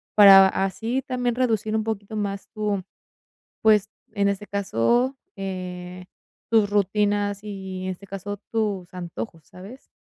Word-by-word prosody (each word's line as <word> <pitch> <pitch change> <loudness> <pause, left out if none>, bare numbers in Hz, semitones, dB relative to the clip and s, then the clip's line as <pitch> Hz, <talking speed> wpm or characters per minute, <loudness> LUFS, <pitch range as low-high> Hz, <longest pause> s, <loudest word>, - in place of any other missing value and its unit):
para 195 -2 +10
así 225 +7 -1
también 245 -2 -1
reducir 220 -4 0
un 220 - 0
poquito 215 -1 -4
más 200 -1 -3
tu, 210 -3 -2 0.8
pues, 210 -2 +4 0.2
en 200 -2 +2
este 200 +1 -2
caso, 200 - +1 0.2
eh, 180 -2 -6 0.4
tus 220 -3 +4
rutinas 205 0 +1
y, 190 -2 -6
en - - -2
este 190 +2 -10
caso, 195 +1 -5
tus 205 -5 -1
antojos, 165 -4 -7
¿sabes? 200 +9 -12
200 Hz, 130 wpm, -24 LUFS, 190-215 Hz, 0.8 s, para